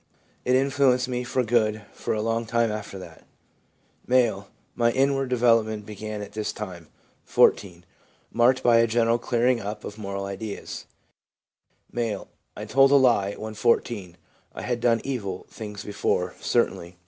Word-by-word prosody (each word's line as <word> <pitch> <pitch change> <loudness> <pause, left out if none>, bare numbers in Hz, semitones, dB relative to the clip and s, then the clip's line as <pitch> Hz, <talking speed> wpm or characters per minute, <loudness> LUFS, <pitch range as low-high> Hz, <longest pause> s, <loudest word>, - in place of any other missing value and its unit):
It 125 - +3
influenced 130 -1 +3
me 125 -1 -2
for 125 +1 0
good 110 -2 +1
for - - -3
a 105 - -2
long 115 0 -1
time 115 0 +1
after 105 -2 -6
that.' 85 -3 -12 0.9
M. 120 -6 +2
' - - -40
My 115 0 +4
inward 135 0 +1
development 115 -4 +2
began 105 0 -6
at - - -10
this 110 -1 -3
time 90 -6 -8 0.4
(14), 90 -3 +2 0.5
marked 125 +2 +3
by 120 -1 +5
a 115 0 +4
general 115 +1 +2
clearing 120 +1 +1
up 105 +1 -6
of 105 - -8
moral 100 -1 -4
ideas/ 100 +2 -6 1.1
M. 115 -3 -2 0.2
' - - -27
I 105 - -5
told 135 +5 +5
a 140 - +5
lie 115 -7 +3
when 110 0 -6
14 105 -5 0 0.4
(I - - -6
had 120 -1 -1
done 115 -1 +2
evil 100 -9 -4
things 105 -2 -7
before, 90 -3 -1
certainly). 85 +1 0
115 Hz, 160 wpm, -25 LUFS, 105-125 Hz, 1.1 s, by